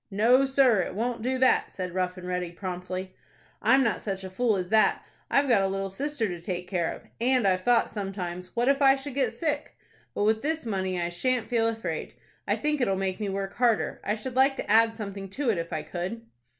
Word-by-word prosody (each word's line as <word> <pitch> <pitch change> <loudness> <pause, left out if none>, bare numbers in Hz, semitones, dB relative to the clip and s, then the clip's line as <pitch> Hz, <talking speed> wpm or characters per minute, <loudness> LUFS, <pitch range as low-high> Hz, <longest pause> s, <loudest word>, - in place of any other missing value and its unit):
"No, 235 +7 +4
sir, 265 -5 +4
it 185 - -2
won't 235 +2 -2
do 260 +3 0
that," 260 0 +3
said 180 -2 -5
Rough 180 0 -1
and 180 0 -8
Ready, 180 -1 -2
promptly. 185 +1 -5 0.5
"I'm 270 0 +5
not 230 - 0
such 195 -2 -4
a 190 - -7
fool 225 +2 +1
as 180 -2 -3
that. 220 0 +3 0.2
I've 280 0 +3
got 235 -6 +4
a 195 - +2
little 195 0 -3
sister 275 +1 -2
to 175 -2 -6
take 180 0 -4
care 175 -4 -1
of, - - -9 0.2
and 250 -3 +3
I've 185 -1 +2
thought 240 +4 +3
sometimes, 185 -3 -5
'What 240 +1 +1
if 280 +1 +3
I 270 -1 +7
should 275 0 -7
get 275 +1 +1
sick?' 300 -3 -2 0.4
but - - 0
with 220 +1 +2
this 315 -1 -2
money, 190 -4 -1
I 170 0 -1
shan't 245 +7 -1
feel 225 -2 +2
afraid. 205 -9 -4 0.3
I - - +2
think 300 -2 0
it'll 195 -6 +2
make 190 0 -2
me 210 -2 -2
work 195 0 -3
harder. 240 -3 +1
I 210 - 0
should 245 +4 -6
like 270 +1 +4
to - - -5
add 225 +1 +5
something 200 -3 -6
to 255 +4 0
it 190 - -1
if 165 0 -5
I 155 -2 -3
could." 190 +7 -5
210 Hz, 230 wpm, -27 LUFS, 185-250 Hz, 0.5 s, I